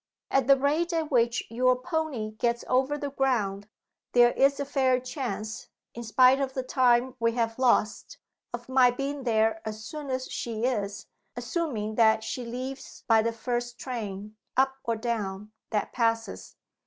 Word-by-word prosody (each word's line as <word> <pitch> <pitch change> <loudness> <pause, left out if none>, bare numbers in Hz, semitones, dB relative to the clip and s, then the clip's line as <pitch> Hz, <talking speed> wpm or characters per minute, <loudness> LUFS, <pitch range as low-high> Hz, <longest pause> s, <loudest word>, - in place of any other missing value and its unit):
At 270 -2 +2
the 275 0 +7
rate 305 +6 +1
at 320 -2 -1
which 235 -2 +2
your 255 +2 +3
pony 265 -5 -3
gets 235 +2 -1
over 265 +3 +1
the 285 -1 -4
ground, 215 -7 -1 0.4
there 240 0 +6
is 275 +2 +3
a 280 - -1
fair 260 -2 +2
chance, 250 -4 -5 0.3
in 235 - -7
spite 255 +4 +4
of 265 -1 -2
the 260 - -1
time 255 -1 +2
we 230 0 +1
have 230 0 -1
lost, 225 -5 +1 0.3
of 240 0 -7
my 260 -1 +5
being 275 +2 -4
there 220 -1 +2
as 215 0 -6
soon 300 0 -7
as 260 0 -2
she 230 0 -3
is 205 -5 -2 0.3
assuming 245 - -3
that 220 0 +4
she 250 - -4
leaves 255 +3 -7
by 225 -1 +5
the 230 +1 0
first 240 +1 -3
train, 210 -4 -6 0.2
up 265 0 +3
or 230 - -1
down, 215 -3 -3 0.2
that 210 - -2
passes." 230 -1 -1
245 Hz, 165 wpm, -27 LUFS, 225-265 Hz, 0.4 s, the